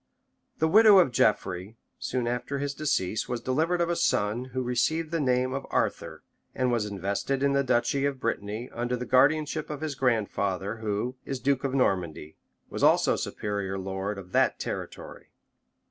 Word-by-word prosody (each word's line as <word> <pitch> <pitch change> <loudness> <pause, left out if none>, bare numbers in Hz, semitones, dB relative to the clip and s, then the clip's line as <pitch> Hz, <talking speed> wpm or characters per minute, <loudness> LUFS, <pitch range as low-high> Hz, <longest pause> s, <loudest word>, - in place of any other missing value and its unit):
] - - -49 0.2
The 160 - +2
widow 215 +3 +7
of 175 -8 +5
Geoffrey, 100 -2 0 0.2
soon 125 -1 -2
after 125 +4 -2
his 140 0 -2
decease, 110 -10 -1
was 120 -1 -2
delivered 160 +9 0
of 170 - +1
a - - 0
son 110 -3 0
who 130 0 -4
received 155 +7 0
the 165 - 0
name 130 -2 +1
of 135 - -4
Arthur, - - -2 0.3
and 130 -1 +1
was 115 -3 0
invested 100 +7 -2
in 140 0 +3
the 140 0 +2
duchy 125 +2 +1
of 140 -2 -2
Brittany, 105 +1 -3
under 120 +1 -2
the 125 - -5
guardianship 150 +4 +2
of 150 -1 -5
his 155 -2 -2
grandfather, 105 -5 -1
who, 110 +4 -3
is 135 -2 -4
duke 135 -1 +1
of 135 -1 -1
Normandy, 85 - -1 0.3
was - - -6
also - - +4
superior 100 -2 -3
lord 95 +2 -4
of 90 -2 -10
that - - +2
territory. - - -6
125 Hz, 175 wpm, -27 LUFS, 105-140 Hz, 0.3 s, widow